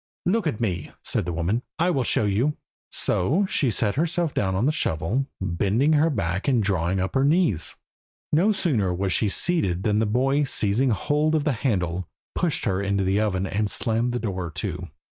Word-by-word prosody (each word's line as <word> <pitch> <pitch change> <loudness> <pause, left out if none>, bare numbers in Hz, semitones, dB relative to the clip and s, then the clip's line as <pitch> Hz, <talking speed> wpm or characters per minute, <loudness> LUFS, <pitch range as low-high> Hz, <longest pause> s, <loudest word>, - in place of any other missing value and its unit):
"Look 200 +1 +1
at 115 - -2
me," 90 -9 -2
said - - -1
the - - -1
woman, 90 +8 -1 0.2
"I 175 +2 +2
will 135 - +1
show 110 - +2
you." 115 +9 +1 0.3
So 155 - +1
she 140 -7 +1
sat 105 -1 0
herself 165 +1 0
down 95 -2 0
on 100 +6 +1
the 150 - +3
shovel, 115 - -1
bending 100 - +1
her 155 +2 +4
back 95 - -2
and 125 -5 +3
drawing 95 -1 0
up 95 +1 -2
her 135 - +2
knees. 145 - +2 0.6
No 180 +8 +4
sooner 135 - +1
was 95 0 0
she 105 +5 +1
seated 95 - +1
than 105 -1 +2
the 110 - +1
boy, 135 +6 +2
seizing 125 0 +2
hold 150 +7 +1
of 155 - +1
the 150 - +1
handle, 95 - -1 0.3
pushed 170 -4 -1
her 95 -3 0
into 100 0 0
the 95 +2 +1
oven 95 -3 0
and 105 +2 -1
slammed 115 +3 -1
the 120 - -1
door 95 -7 -3
to. 80 - -5
110 Hz, 195 wpm, -24 LUFS, 95-145 Hz, 0.6 s, her